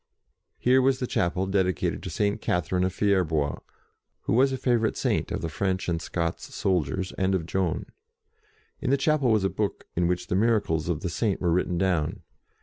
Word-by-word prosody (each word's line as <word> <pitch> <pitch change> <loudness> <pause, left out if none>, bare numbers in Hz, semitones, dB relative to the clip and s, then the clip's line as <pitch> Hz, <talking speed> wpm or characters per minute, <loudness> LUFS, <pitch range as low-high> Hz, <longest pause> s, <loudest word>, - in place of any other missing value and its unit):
Here 130 +2 +4
was 130 0 +3
the 130 - -2
chapel 90 -4 0
dedicated 95 -4 0
to - - -6
St. 105 +1 0
Catherine 90 +1 0
of 95 - +1
Fier 100 0 +2
bois, 75 -4 -1 0.6
who - - -1
was 135 +3 +4
a 130 - -1
favourite 120 -3 +1
Saint - - 0
of - - -2
the - - -2
French 95 +4 -1
and 85 -2 -1
Scots 85 -1 -3
soldiers, 90 0 0
and 95 0 +2
of 85 -4 -2
Joan. 90 -1 -1 0.9
In - - -2
the 140 - +4
chapel 150 -3 +2
was 110 -3 +3
a - - +3
book 105 +1 -3
in 85 0 +2
which 90 0 -1
the - - -2
miracles 100 -7 +1
of 80 -3 -1
the 90 - -2
Saint 105 +1 0
were 90 -2 +1
written 90 0 +1
down. 85 -5 0
95 Hz, 195 wpm, -26 LUFS, 85-110 Hz, 0.9 s, Here